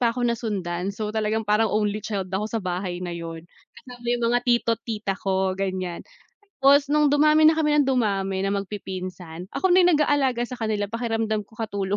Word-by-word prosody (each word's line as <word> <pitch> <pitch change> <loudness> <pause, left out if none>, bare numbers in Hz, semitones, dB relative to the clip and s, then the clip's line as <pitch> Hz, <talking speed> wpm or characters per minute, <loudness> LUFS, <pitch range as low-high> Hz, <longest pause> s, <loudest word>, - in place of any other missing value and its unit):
pa 235 -2 +2
ako 245 -1 -1
nasundan, 195 -7 -2
so 210 0 -4
talagang 220 0 -1
parang 210 +2 +2
only 210 0 0
child 195 -3 -4
ako 205 +3 -1
sa 225 0 -2
bahay 180 0 -3
na 175 - -4
yun, 165 -1 -7 0.3
kasama 245 -2 -13
yung 240 -1 +1
mga 245 - +4
tito't 230 -2 +2
tita 210 -3 -2
ko 190 -1 0
ganiyan. 185 -2 -3 0.6
Tapos 280 +1 +5
nung 300 -1 +4
dumami 305 +1 +5
na 320 - +3
kami 300 -1 +2
ng 280 - +2
dumami 195 -6 0
na 195 - 0
magpipinsan, 185 -3 -6
ako 375 -1 +1
na 370 - +6
yung 355 - +5
nag-aalaga 275 -5 +1
sa 250 - -6
kanila 210 -2 -1
pakiramdam 225 -2 -1
ko 225 - -20
katulong. 200 -3 -2
215 Hz, 190 wpm, -24 LUFS, 190-240 Hz, 0.6 s, na